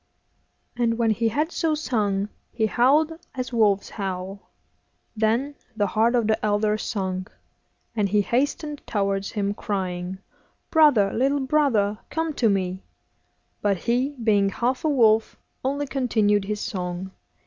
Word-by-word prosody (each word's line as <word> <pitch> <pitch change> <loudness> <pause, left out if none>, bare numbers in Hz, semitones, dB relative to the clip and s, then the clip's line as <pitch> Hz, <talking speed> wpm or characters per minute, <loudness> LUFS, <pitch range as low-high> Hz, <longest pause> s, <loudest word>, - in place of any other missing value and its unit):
And 235 -2 +1
when 230 -2 +2
he 225 +2 +1
had 300 +9 0
so 325 -3 0
sung 210 -8 -1 0.2
he 220 - 0
howled 280 +8 +3 0.2
as 255 -1 -4
wolves 210 -4 +2
howl. 195 -1 -5 0.7
Then 230 +6 +1 0.2
the 205 -2 +1
heart 220 +5 +2
of 235 -2 +2
the 220 0 0
elder 210 0 +2
sunk, 190 -5 -3 0.6
and 205 -3 +1
he 205 +1 +3
hastened 285 - -1
towards 195 -2 -1
him, 200 -1 -1
crying, 185 -3 -3 0.5
'Brother, 285 - +5
little 275 +4 +1
brother, 260 -8 +2
come 320 0 -2
to 235 -5 +2
me;' 190 -1 -1 0.8
but 200 -2 +1
he, 250 +8 0
being 205 -3 +3
half 245 +6 -1
a 315 - +2
wolf, 225 -5 +3 0.3
only 280 +2 -1
continued 220 -7 +1
his 210 +1 -3
song. 180 0 -4
220 Hz, 135 wpm, -24 LUFS, 200-260 Hz, 0.8 s, Brother